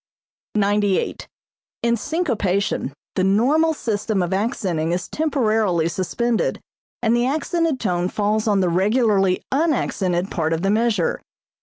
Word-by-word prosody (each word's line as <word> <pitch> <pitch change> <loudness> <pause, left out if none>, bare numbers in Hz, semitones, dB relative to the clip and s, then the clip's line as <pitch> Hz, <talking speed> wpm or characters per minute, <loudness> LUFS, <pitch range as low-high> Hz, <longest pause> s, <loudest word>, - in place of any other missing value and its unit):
98. 205 -1 +1 0.6
In 235 0 +3
syncopation 210 - -1 0.2
the 185 - 0
normal 260 +12 +3
system 215 - -1
of 175 +2 -2
accenting 190 -6 -1
is 175 0 -2
temporarily 220 - +1
suspended 225 +7 -1 0.4
and 230 0 +3
the 240 +1 +2
accented 315 0 0
tone 180 -3 0
falls 210 +2 0
on 200 -2 +3
the 180 - +2
regularly 195 0 +2
unaccented 210 - 0
part 165 -2 0
of 165 +2 -2
the 195 - +2
measure. 215 -5 +1
210 Hz, 125 wpm, -21 LUFS, 185-240 Hz, 0.6 s, In